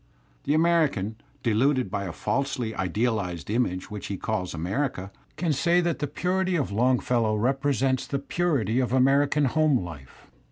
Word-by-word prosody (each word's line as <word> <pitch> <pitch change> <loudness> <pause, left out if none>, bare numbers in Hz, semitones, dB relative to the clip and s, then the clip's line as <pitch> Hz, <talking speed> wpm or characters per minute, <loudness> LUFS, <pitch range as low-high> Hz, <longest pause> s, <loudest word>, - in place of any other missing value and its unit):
The 145 - +2
American, 155 - +2 0.3
deluded 125 0 +2
by 100 0 -2
a 90 - -4
falsely 125 - -2
idealized 100 -2 -2
image 105 -5 -1
which 105 -1 -6
he 100 - -4
calls 95 -5 -3
America, 95 - -2 0.2
can 165 -2 0
say 170 +5 +3
that 170 -2 0
the 145 - -1
purity 185 +2 0
of 145 -10 -1
Longfellow 120 -1 +2
represents 135 +2 0
the 140 - -1
purity 140 - 0
of 125 -1 0
American 140 +3 +3
home 155 +1 +3
life. 80 -8 -10
125 Hz, 150 wpm, -26 LUFS, 105-145 Hz, 0.3 s, say